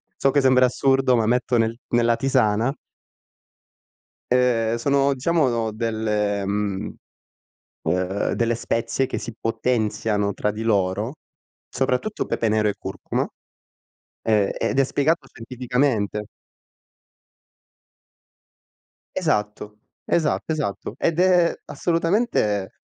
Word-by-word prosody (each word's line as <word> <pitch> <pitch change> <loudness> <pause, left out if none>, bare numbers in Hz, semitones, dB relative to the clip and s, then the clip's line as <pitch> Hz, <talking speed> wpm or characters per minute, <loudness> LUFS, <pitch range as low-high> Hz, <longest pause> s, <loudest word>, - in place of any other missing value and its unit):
so 135 - +2
che 145 - +3
sembra 130 -1 +5
assurdo, 135 0 +2
ma 115 - +2
metto 125 +1 +1
nel 115 0 +1
nella 120 0 +3
tisana 125 -2 +1 1.6
ehm, 120 -3 +2
sono 140 +3 +2
diciamo 130 -6 +1
delle 105 -2 -1
mhmm, 100 -1 -2 0.9
uhm, 90 +4 -1
delle 115 0 +1
spezie 115 +3 -1
che - - -3
si 115 - -7
potenziano 110 -3 0
tra 105 +2 -1
di 105 +2 -5
loro, 105 +1 0 0.6
soprattutto 135 - -1
pepe 115 - 0
nero 105 0 +2
e 105 - -1
curcuma, - - -3 1.0
ehm, 105 -3 +2
ed - - 0
è - - +6
spiegato 145 +3 +1
scientificamente. 120 -3 -1 2.9
Esatto, 105 0 -2 0.3
esatto, 160 -1 0
esatto. 120 -7 -3
Ed 165 +2 0
è 180 -2 +4
assolutamente, 165 - 0
115 Hz, 100 wpm, -23 LUFS, 105-135 Hz, 2.9 s, è